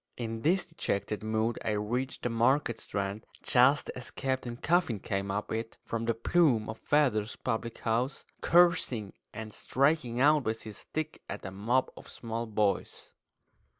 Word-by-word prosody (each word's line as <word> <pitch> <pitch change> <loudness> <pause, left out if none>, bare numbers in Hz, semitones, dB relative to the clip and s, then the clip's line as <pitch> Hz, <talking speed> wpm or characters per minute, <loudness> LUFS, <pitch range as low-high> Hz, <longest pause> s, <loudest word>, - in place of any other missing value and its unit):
In 115 -2 -4
this 175 +6 +2
dejected 105 -9 -2
mood 110 +1 0
I 110 - 0
reached 120 +6 -2
the 120 - +1
Market 120 +2 +2
Strand 100 +1 -3 0.2
just 130 +3 +4
as 125 - -6
Captain 130 -3 -2
Coffin 165 - +2
came 100 0 -2
up 100 +2 -2
it 115 +1 -3
from 115 0 -2
the 115 -1 +1
Plume 120 -3 +3
of 110 - -6
Feathers 125 -8 +2
public 115 -1 -3
house, 120 +4 -1 0.2
cursing 165 - +3 0.2
and 110 -1 -7
striking 135 -2 +1
out 150 +1 +5
with 110 -1 -2
his 105 -2 -8
stick 155 0 -5
at - - -6
a 95 - -4
mob 115 +7 +1
of - - -12
small 115 0 -4
boys. 105 -2 -1
115 Hz, 155 wpm, -30 LUFS, 110-135 Hz, 0.2 s, out